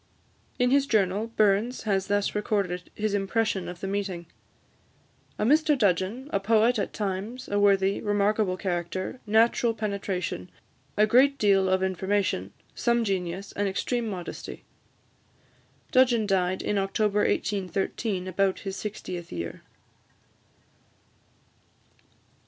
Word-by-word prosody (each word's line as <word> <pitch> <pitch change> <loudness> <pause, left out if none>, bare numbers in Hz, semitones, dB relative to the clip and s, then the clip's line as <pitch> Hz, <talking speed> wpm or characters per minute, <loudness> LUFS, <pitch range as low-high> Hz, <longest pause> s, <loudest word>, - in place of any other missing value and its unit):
In 250 0 +2
his 280 0 +3
journal, 205 -1 +1
Burns 215 +2 +1
has 195 -3 0
thus 205 0 0
recorded 200 -4 -1
his 215 -1 -1
impression 205 -1 0
of 175 -1 -9
the 195 - -3
meeting: 195 -3 -3 1.1
"A - - 0
Mr 300 +3 +4
Dudgeon, 205 +4 0
a 200 - +2
poet 225 +3 +3
at - - -2
times, 205 +5 -4
a 205 - 0
worthy, 195 -1 +3
remarkable 205 -2 +1
character, 180 +4 -3
natural 225 +2 +3
penetration, 195 - -3 0.5
a 210 - +6
great 265 +5 +4
deal 195 -2 +3
of 190 0 +2
information, 190 - -1 0.2
some 235 -1 +1
genius, 190 -1 -3
and 205 0 -1
extreme 235 +4 -1
modesty." 180 -4 -6 1.3
Dudgeon 250 -5 +4
died 185 -2 0
in 205 - 0
October 205 +1 +1
1813, 195 0 -1
about 190 +1 0
his 195 -1 -5
sixtieth 185 -4 -6
year. 85 -1 -5
200 Hz, 115 wpm, -27 LUFS, 190-220 Hz, 1.3 s, a